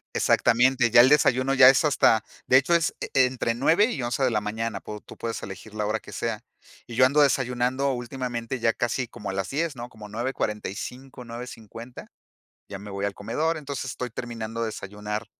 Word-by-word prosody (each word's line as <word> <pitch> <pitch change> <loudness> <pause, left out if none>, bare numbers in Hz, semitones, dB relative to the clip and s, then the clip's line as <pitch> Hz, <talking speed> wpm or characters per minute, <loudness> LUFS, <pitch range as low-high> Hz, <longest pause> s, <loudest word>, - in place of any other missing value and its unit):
Exactamente, 125 0 +3
ya 120 - +7
el 125 - +9
desayuno, 135 -2 +3
ya 130 -1 +9
es 135 +3 +4
hasta 110 -6 +3 0.2
de 130 - +6
hecho, 155 +6 +3
es 165 -1 +1
e 135 -2 +2
entre 120 -2 -2
9 165 - +4
y 185 - -3
11 120 +3 -2
de 130 - +4
la 105 -2 0
mañana, 110 +1 -3
pu 105 0 -7
tú - - -14
puedes 115 -1 -4
elegir 100 +2 -9
la 105 -1 -2
hora 110 +1 -1
que - - -12
sea. 115 -1 -3 0.4
Y 120 - -9
yo 130 - +6
ando 145 +3 +4
desayunando 130 0 +1
últimamente, 120 -1 -4
ya 115 -1 +2
casi 120 +1 -2
como 105 - -8
a - - -3
las 95 -1 -3
10, 155 +1 -2
¿no? 120 +1 -6
Como 110 -3 -12
9:45, 125 +2 -4
9:50 115 0 -9 0.6
ya 100 - -7
me 105 +1 -10
voy 100 +1 -3
al 100 -1 -2
comedor, 160 +10 -1
entonces, 140 -3 -5
estoy 125 -2 -5
terminando 115 -1 -5
de 115 - 0
desayunar 105 +1 -5
120 Hz, 200 wpm, -25 LUFS, 110-130 Hz, 0.6 s, el